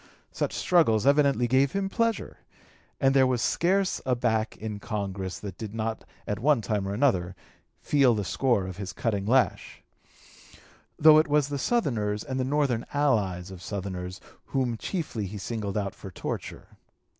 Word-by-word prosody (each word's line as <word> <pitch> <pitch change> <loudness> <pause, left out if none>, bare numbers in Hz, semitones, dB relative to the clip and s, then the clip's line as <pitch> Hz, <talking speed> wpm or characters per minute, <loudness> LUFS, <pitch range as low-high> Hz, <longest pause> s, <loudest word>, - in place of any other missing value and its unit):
Such - - -2
struggles 125 - +3
evidently 140 -3 +4
gave 130 +2 +3
him 195 0 0
pleasure, 230 +2 -1 0.6
and 135 0 +3
there 135 -1 +5
was 125 -2 0
scarce 190 +9 +1
a 125 - +1
back 110 -2 0
in 105 -1 -5
Congress 95 -3 -4
that 100 -4 -8
did 110 -1 -6
not 110 0 -3 0.2
at 105 -2 -3
one 145 +1 +3
time 100 -1 -1
or 100 - -2
another 95 -8 +1 0.5
feel 135 -5 +4
the 105 - -1
score 120 -3 +1
of 95 0 -7
his 100 -2 -5
cutting 100 -4 -2
lash; 130 +2 +1 1.1
though 155 0 +8
it 155 - +2
was 145 -1 +2
the 140 -1 -3
Southerners 110 - 0
and 130 -2 -4
the - - +1
Northern 135 -4 0
allies 100 -11 0
of 95 -2 -10
Southerners 95 -1 -5 0.3
whom 130 -4 -1
chiefly 115 - -3
he 105 +3 -7
singled 105 -1 -4
out 100 -2 -2
for 100 - -10
torture. 90 - -6
115 Hz, 165 wpm, -27 LUFS, 100-140 Hz, 1.1 s, though